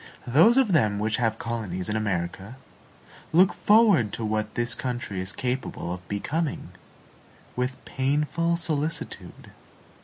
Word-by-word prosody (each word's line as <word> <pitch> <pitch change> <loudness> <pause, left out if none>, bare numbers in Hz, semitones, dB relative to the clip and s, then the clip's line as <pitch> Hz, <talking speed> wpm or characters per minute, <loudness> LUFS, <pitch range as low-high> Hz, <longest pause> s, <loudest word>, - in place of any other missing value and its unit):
Those 165 - +5
of 260 -7 +4
them 110 - +3
which 110 +1 0
have 115 -3 0
colonies 105 -7 -4
in 105 - -2
America 95 +1 -3 0.8
look 180 +4 +5
forward 205 - +4
to 115 - -3
what 110 0 -2
this 120 0 -1
country 120 -7 -4
is 95 +1 -4
capable 125 -9 -3
of 90 0 -9
becoming, 145 +10 -3 0.9
with 125 +1 -2
painful 150 +5 0
solicitude. 160 -1 -3
120 Hz, 125 wpm, -26 LUFS, 105-155 Hz, 0.9 s, Those